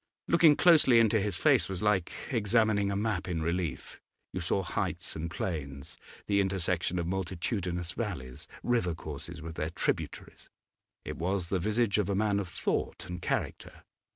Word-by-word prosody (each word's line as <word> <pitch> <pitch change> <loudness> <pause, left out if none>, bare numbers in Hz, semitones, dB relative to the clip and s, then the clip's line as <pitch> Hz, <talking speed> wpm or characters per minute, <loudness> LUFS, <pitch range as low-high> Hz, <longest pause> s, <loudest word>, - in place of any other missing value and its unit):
Looking 165 -3 +6
closely 155 -9 +6
into 110 -1 +4
his 100 -3 -1
face - - +3
was 95 0 -4
like 105 -4 +2 0.2
examining 110 -3 +2
a 100 - -1
map 100 -3 -1
in 85 -3 -2
relief; 85 -4 -3 0.3
you 90 - -3
saw 95 +2 +1
heights 90 - -3
and 80 +2 -3
plains, 70 -6 -4 0.3
the 100 -1 +3
intersection 90 -2 0
of 85 - -1
multitudinous 90 -1 -2
valleys, 85 - -5 0.2
river 115 -9 +1
courses 80 +2 -7
with 80 0 -7
their 80 - -1
tributaries. 80 - -3 0.6
It - - -5
was 90 0 -1
the 95 - +1
visage 105 +3 +1
of 100 -2 0
a 100 - +1
man 100 0 +2
of 95 -3 -4
thought - - -2
and 90 0 -6
character. - - -3
95 Hz, 160 wpm, -30 LUFS, 85-105 Hz, 0.6 s, Looking